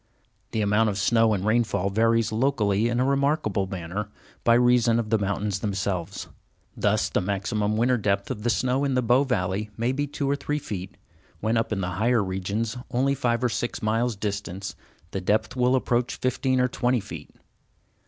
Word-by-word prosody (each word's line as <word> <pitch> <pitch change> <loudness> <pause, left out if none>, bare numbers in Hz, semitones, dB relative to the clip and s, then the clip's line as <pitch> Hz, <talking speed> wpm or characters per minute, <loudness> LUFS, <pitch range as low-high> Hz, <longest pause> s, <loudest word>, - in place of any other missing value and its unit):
The 110 - -1
amount 105 +2 +3
of 100 - -3
snow 115 +2 +3
and 100 -2 -1
rainfall 110 -4 +1
varies 115 +2 +2
locally 110 -3 +1
in 120 0 0
a 130 - +2
remarkable 140 - +1
manner, 95 +3 -5 0.3
by 115 - +5
reason 120 -1 +4
of 115 -2 -2
the 110 - +3
mountains 100 0 -1
themselves. 100 -2 -3 0.5
Thus - - +1
the - - 0
maximum 105 +2 -1
winter 125 +2 +3
depth 100 0 -1
of 110 -5 -4
the 120 - 0
snow 130 +3 +1
in 135 -2 0
the 125 - +2
Bow 120 +4 +4
valley 105 -5 -1
may 120 +2 +1
be 145 +2 -1
two 140 0 -3
or 140 - +2
three 150 +1 -2
feet, 95 -10 -6 0.4
when 110 +2 0
up 115 0 0
in 100 -2 -1
the 90 - -2
higher 120 -1 +3
regions, 100 +5 -2
only 135 +3 +1
five 125 -3 0
or 125 - +3
six 120 +1 -3
miles 115 +2 +1
distant, 100 -2 -4 0.4
the 95 - -3
depth 105 +6 0
will 125 0 +3
approach 125 -1 0
fifteen 130 0 0
or 125 - +3
twenty 125 0 0
feet. 85 -7 -9
115 Hz, 185 wpm, -25 LUFS, 100-125 Hz, 0.5 s, by